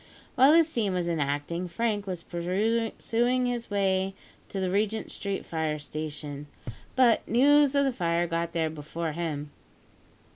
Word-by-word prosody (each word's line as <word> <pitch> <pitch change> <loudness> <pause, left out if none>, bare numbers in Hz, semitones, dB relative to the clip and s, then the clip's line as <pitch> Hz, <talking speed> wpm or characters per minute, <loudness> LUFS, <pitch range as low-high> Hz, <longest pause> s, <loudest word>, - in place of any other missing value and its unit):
While 265 +4 +6
this 330 -1 +6
scene 225 - -1
was 175 -1 -1
enacting 155 +2 -1
Frank 205 +2 -1
was 180 -3 -4
pursuing 225 +7 0
his 240 -1 -2
way 195 -1 +1 0.3
to 195 - -4
the 185 -1 -1
Regent 215 +2 0
Street 200 -1 -4
Fire 160 -2 -2
Station; 150 -1 -6 0.5
but 250 -4 +4
news 285 +3 +5
of 280 0 +4
the 270 - +1
fire 170 -4 +1
got 170 0 -2
there 160 -2 0
before 160 +2 -4
him. 150 -3 -4
185 Hz, 145 wpm, -28 LUFS, 165-230 Hz, 0.5 s, While